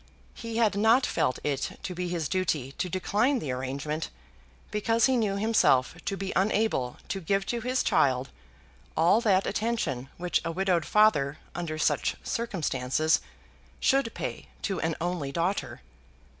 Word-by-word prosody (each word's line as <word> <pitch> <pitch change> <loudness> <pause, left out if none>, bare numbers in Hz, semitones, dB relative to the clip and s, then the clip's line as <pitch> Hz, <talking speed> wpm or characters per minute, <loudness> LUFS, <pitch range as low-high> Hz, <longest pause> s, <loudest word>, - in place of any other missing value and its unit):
He 230 -1 -6
had 220 -4 +3
not 225 +5 +4
felt 130 - 0
it 140 -2 -2
to 185 - -4
be 180 0 -3
his 170 -4 -2
duty 155 -8 -1
to 180 - -1
decline 210 - +1
the 150 - -3
arrangement 140 +5 -3 0.6
because 225 +2 +2
he 265 - +3
knew 215 -5 +1
himself 200 - +3
to 200 -1 -2
be 195 0 -3
unable 195 - +1
to 195 - -2
give 195 +3 0
to 240 -1 -2
his 255 +2 0
child 130 -1 +2 0.7
all 175 +8 +5
that 195 -5 +3
attention 195 - -1
which 180 0 0
a 165 - -2
widowed 180 -2 +1
father 155 -10 +3 0.2
under 165 -3 -4
such 155 - +1
circumstances 155 - 0 0.6
should 270 -4 +2
pay - - -5 0.2
to 195 -4 -1
an 165 -1 0
only 170 -5 -2
daughter. 175 +6 -2
185 Hz, 150 wpm, -28 LUFS, 150-215 Hz, 0.7 s, all